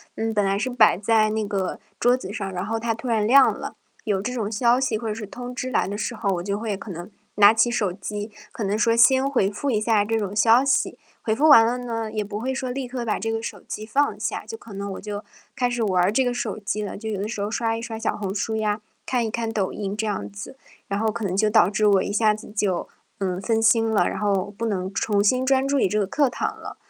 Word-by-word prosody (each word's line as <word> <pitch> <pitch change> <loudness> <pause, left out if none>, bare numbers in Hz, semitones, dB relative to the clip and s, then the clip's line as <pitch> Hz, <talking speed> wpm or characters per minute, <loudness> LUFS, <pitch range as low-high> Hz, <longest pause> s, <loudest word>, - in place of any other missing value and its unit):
嗯， 225 0 -2
本 205 - +2
来 195 0 +1
是 255 +5 -1
摆 230 -7 +5
在 215 +2 +3
那 215 0 -1
个 195 -2 -2 0.2
桌 245 +1 +4
子 195 -5 -7
上， 195 -3 -4
然 180 0 -4
后 225 +2 -2
它 230 0 -1
突 230 - -8
然 220 -3 +1
亮 270 +2 +6
了。 - - -7 0.3
有 200 -3 0
这 250 +4 -3
种 220 -4 -2
消 240 +3 +3
息 235 -5 0
或 225 +1 -5
者 215 - -2
是 220 -1 -6
通 245 +4 -8
知 255 +1 -4
来 - - +1
的 200 +1 -4
时 235 - -3
候， 215 -2 -2
我 175 - -4
就 200 +1 -2
会 220 -3 -2
可 195 +1 -8
能 175 +4 -7 0.3
拿 205 +1 +7
起 240 +2 +2
手 205 -6 0
机， 210 +2 -5 0.2
可 - - -8
能 200 +2 0
说 230 +1 +3
先 265 +3 +5
回 220 -8 +2
复 270 +7 -2
一 215 - +2
下 215 -1 +2
这 225 +1 0
种 205 -1 -4
消 230 +3 +5
息， 275 - +1 0.2
回 220 - 0
复 285 +8 +3
完 255 -7 +9
了 240 +2 0
呢， 230 -3 -4
也 215 -1 -2
不 205 0 -5
会 265 +2 -1
说 265 -1 -3
立 255 +1 -3
刻 245 -1 -5
把 215 - 0
这 225 +1 -2
个 225 0 -2
手 205 -4 -6
机 215 - -7
放 285 +6 0
下， - - -3
就 450 - -7
可 230 - -13
能 200 0 -5
我 - - -6
就 205 0 -6 0.3
开 245 -1 +1
始 240 -1 -2
玩 185 -4 +2
儿 185 - +3
这 260 +4 +2
个 245 - 0
手 220 -3 -3
机 210 +1 -3
了， 205 - -5
就 220 +2 -7
有 205 -3 -2
的 210 - -3
时 220 - -5
候 200 +1 -1
刷 225 0 -1
一 - - -6
刷 230 -1 -5
小 225 - -2
红 195 -2 -4
书 220 +2 -1
呀， 210 -1 -1 0.2
看 245 -3 0
一 220 - -3
看 230 -1 -2
抖 205 -4 -1
音 200 -1 -4
这 220 - -2
样 200 - -3
子。 100 - -9 0.3
然 200 0 -1
后 220 0 +1
可 220 +1 -4
能 190 -2 -1
就 215 +1 +3
导 190 -3 +5
致 210 +1 0
我 195 -2 +4
一 - - -3
下 215 +1 +3
子 210 0 -9
就， 200 -4 -1 0.3
嗯， 185 -1 -2
分 225 +1 0
心 225 0 +4
了， 220 - +2
然 - - -4
后 205 -1 0
不 230 - -2
能 190 -3 -2
重 205 0 +1
新 255 +5 +2
专 270 0 +3
注 275 0 +1
于 - - +3
这 210 - -1
个 205 - +2
课 280 +7 +1
堂 - - -2
了。 - - -9
220 Hz, 300 characters per minute, -23 LUFS, 205-235 Hz, 0.3 s, 完